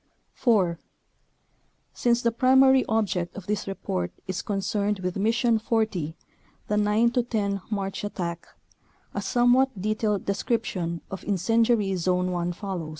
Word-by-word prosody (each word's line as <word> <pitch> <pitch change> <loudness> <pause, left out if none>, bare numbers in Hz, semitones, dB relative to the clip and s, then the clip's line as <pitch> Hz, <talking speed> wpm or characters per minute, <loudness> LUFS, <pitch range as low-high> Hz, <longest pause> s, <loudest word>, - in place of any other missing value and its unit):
4. 190 -9 +2 1.1
Since 240 0 +1
the 235 - +3
primary 265 +2 +5
object 200 -6 0
of 195 - -8
this 205 0 -2
report 90 - -3
is 185 -1 -3
concerned 205 +1 -1
with 180 -1 -2
Mission 225 +3 +2
40, 215 -9 -1 0.5
the 210 - 0
9 210 +3 +3
10 215 -5 -1
March 195 -2 -3
at 205 - -5
tack, 170 -2 -4 0.7
a 205 - -2
somewhat 245 +3 +3
detailed 215 0 -1
description 195 -5 -2
of 195 - -5
Incen 210 +4 +2
diary 210 -5 +2
Zone 180 +1 0
1 175 0 -1
follows. 180 -4 -5
205 Hz, 135 wpm, -26 LUFS, 185-230 Hz, 1.1 s, primary